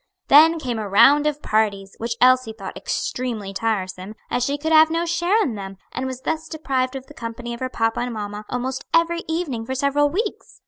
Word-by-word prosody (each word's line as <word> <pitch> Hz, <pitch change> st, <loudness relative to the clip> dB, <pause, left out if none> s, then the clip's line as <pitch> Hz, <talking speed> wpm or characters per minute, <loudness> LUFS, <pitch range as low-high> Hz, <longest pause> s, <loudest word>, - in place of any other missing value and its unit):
Then 320 Hz, +4 st, +7 dB
came 245 Hz, -7 st, -3 dB
a 210 Hz, -2 st, -4 dB
round 285 Hz, +9 st, +6 dB
of 300 Hz, 0 st, -2 dB
parties, 200 Hz, -3 st, 0 dB
which 230 Hz, 0 st, -2 dB
Elsie 255 Hz, -2 st, +4 dB
thought 195 Hz, -3 st, -8 dB
extremely 225 Hz, -6 st, -3 dB
tiresome, 195 Hz, -1 st, -3 dB, 0.2 s
as 245 Hz, -, +1 dB
she 280 Hz, +3 st, 0 dB
could 320 Hz, +2 st, -3 dB
have 315 Hz, 0 st, +7 dB
no 330 Hz, +1 st, 0 dB
share 350 Hz, +6 st, +2 dB
in 255 Hz, -, -2 dB
them, 195 Hz, -2 st, -7 dB
and 260 Hz, -, -3 dB
was 260 Hz, -1 st, -6 dB
thus 320 Hz, +3 st, -3 dB
deprived 270 Hz, -5 st, -2 dB
of 265 Hz, -1 st, -6 dB
the 295 Hz, -, -14 dB
company 235 Hz, -1 st, -6 dB
of 235 Hz, -, -7 dB
her 255 Hz, -, -3 dB
papa 225 Hz, -2 st, 0 dB
and 245 Hz, 0 st, -2 dB
mamma 210 Hz, 0 st, -5 dB
almost 255 Hz, +1 st, -3 dB
every 335 Hz, +1 st, +2 dB
evening 320 Hz, -8 st, -2 dB
for 260 Hz, +3 st, -4 dB
several 280 Hz, +2 st, +2 dB
weeks. 410 Hz, +7 st, -4 dB
255 Hz, 210 wpm, -22 LUFS, 225-300 Hz, 0.2 s, Then